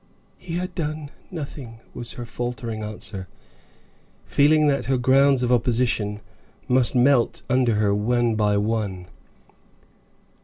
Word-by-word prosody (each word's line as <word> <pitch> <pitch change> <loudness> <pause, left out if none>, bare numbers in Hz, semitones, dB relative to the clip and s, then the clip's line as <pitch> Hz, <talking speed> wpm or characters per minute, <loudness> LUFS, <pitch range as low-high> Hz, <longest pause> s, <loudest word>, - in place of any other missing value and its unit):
"He 170 -2 -6
had 180 +1 -3
done 155 -3 -4 0.2
nothing," 140 -8 -7
was 120 0 -5
her 120 - -7
faltering 120 -2 -4
answer, 105 -2 -5 1.0
feeling 155 +2 +4
that 140 -2 +1
her 135 -1 +1
grounds 135 +1 +4
of 125 - +1
opposition 115 -3 +1 0.5
must 125 0 +2
melt 125 -1 +3
under 125 -3 +3
her 105 -1 +2
one 120 +3 +1
by 105 -1 +2
one. 100 -4 -2
120 Hz, 120 wpm, -23 LUFS, 110-140 Hz, 1.0 s, feeling